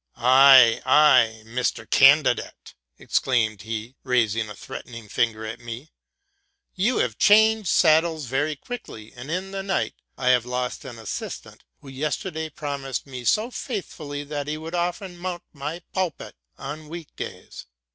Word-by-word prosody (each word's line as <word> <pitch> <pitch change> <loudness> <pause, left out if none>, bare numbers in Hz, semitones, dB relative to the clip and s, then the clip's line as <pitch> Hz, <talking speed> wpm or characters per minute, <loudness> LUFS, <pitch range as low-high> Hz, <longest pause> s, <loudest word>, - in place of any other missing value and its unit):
'' - - -47
Ay, 130 -2 +7
ay, 130 -6 +5
Mr. 120 +2 -2
Candidate!'' - - +3 0.2
exclaimed 110 -6 0
he, 115 +2 -6
rusing 115 -4 +1
a 105 - -8
threatening 115 -3 -9
finger 110 0 -1
at 110 +2 -6
me; 120 +5 -9 0.4
'* 400 0 -47 0.3
you 215 +7 +1
have 115 -4 -1
changed 220 -2 +5
sad 160 -1 +5
dles 160 -4 -4
very 145 +5 -1
quickly: 135 - -9
"and 125 +3 -9
in 185 +3 -3
the 195 0 -4
night 195 0 -1 0.2
I 125 - 0
have 125 -2 +4
lost 125 +2 -4
an 125 -3 -8
assist 110 -3 -6
ant, - - -16 0.2
who - - -15
yesterday 155 +4 -3
promised 140 -3 -5
me 130 -3 -8
so 220 - +2
faithfully 155 - -5
that 145 -1 -5
he 150 +1 -3
would 160 +2 -8
often 175 +1 -3
mount 175 -1 -5
my 150 +4 -6
pulpit 185 -3 -3 0.2
on 150 +2 -8
week 165 -1 -9
days. - - -8
140 Hz, 155 wpm, -24 LUFS, 120-170 Hz, 0.4 s, Ay